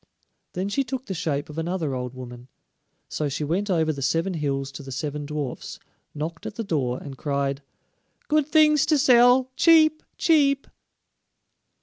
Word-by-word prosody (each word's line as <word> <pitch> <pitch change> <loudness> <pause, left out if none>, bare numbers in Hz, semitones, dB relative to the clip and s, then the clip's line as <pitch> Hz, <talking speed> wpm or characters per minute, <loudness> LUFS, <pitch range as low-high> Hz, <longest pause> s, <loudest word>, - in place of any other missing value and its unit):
Then 185 +2 -2
she 275 +7 0
took 260 -1 -5
the 195 - -4
shape 155 -5 -2
of 150 +1 -7
another 165 -3 -2
old 125 0 -4
woman. 125 -1 -10 0.6
So 150 -2 -2
she 145 +2 -3
went 180 +8 -1
over 160 -4 +1
the 140 - -7
seven 165 +8 0
hills 140 -4 -2
to 135 - -8
the 135 -1 -9
seven 145 +2 -4
dwarfs, 150 -4 -5 0.4
knocked 160 +3 -5
at - - -7
the 230 - -3
door, 135 - -1
and 135 0 -9
cried, 140 -1 -1 0.7
"Good 300 -1 +2
things 305 -2 +4
to 310 - +3
sell, 255 -1 +5
cheap, 315 0 +5 0.2
cheap!" 280 -4 +3
160 Hz, 160 wpm, -24 LUFS, -, 0.7 s, sell